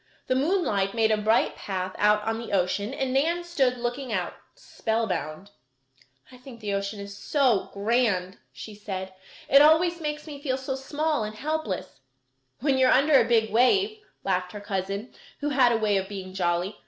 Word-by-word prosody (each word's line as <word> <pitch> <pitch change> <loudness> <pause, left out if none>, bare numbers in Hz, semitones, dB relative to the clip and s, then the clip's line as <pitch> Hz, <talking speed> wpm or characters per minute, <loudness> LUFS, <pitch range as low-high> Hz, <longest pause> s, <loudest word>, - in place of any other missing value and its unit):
The - - 0
moonlight 260 - +1
made 220 -1 +3
a 215 - +3
bright 220 +2 +2
path 185 -1 -4
out 210 0 +3
on 225 +1 -2
the 230 -3 -7
ocean 200 +3 0
and 265 -1 -2
Nan 335 +6 +1
stood 270 -8 +1
looking 245 +1 -4
out, 185 -4 -2 0.2
spellbound. 200 -5 -3 0.8
"I 255 - -13
think 250 -1 -12
the 205 -2 -3
ocean 200 +1 -3
is 200 0 -8
so 255 -3 +1
grand," 200 -3 0
she 215 - -9
said. 190 -2 -6 0.3
"It 275 - +7
always 330 +3 +4
makes 300 -1 -4
me 290 -3 -9
feel 260 -3 -1
so 265 0 -4
small 290 +1 -1
and 215 0 -5
helpless." 290 - -4 0.6
"When 270 -1 +2
you 260 - +5
are - - +4
under 275 0 +5
a 230 - 0
big 220 -2 +3
wave," 390 - +3 0.2
laughed 180 -1 -1
her 205 - -6
cousin, 200 +2 -4 0.3
who 295 - -1
had 260 -4 +4
a 230 - +2
way 210 -2 +1
of 190 0 -3
being 190 -2 -7
jolly. 180 +2 -1
225 Hz, 180 wpm, -26 LUFS, 200-275 Hz, 0.8 s, It